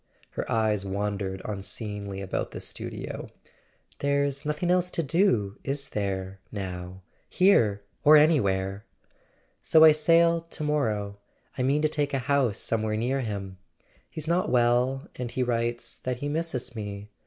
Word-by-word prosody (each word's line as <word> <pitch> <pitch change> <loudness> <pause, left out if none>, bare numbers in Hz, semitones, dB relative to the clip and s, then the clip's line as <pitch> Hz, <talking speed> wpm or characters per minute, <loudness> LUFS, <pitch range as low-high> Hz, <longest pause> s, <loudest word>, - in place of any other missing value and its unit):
Her - - -4
eyes 110 -3 +1
wandered 100 -1 -3
unseeingly 100 -1 -5
about 95 - -3
the - - -7
studio. - - -6 0.7
"There's 140 0 0
nothing 150 +4 0
else 180 0 +2
to 165 - -1
do, 135 - +1
is 140 0 -1
there 95 -2 -3
—now—here 100 - 0 0.2
or 155 +1 +8
anywhere? 100 -10 +2 0.8
So 160 - +5
I 160 - +10
sail 165 +2 +4
to 165 -2 -4
morrow; 105 -9 -1 0.4
I - - -3
mean 140 +4 +2
to - - +5
take 145 -2 -1
a 130 -2 -2
house 135 -7 +2
somewhere 110 -1 -1
near 125 +5 0
him. 100 -5 -5 0.5
He's 155 -1 -6
not 175 +2 +1
well, 125 +2 +2
and 125 -1 -3
he 125 +2 -1
writes 120 -1 -2
that 125 -1 -3
he 145 - -4
misses 145 -6 -3
me. 105 -1 -6
120 Hz, 145 wpm, -27 LUFS, 100-150 Hz, 0.8 s, I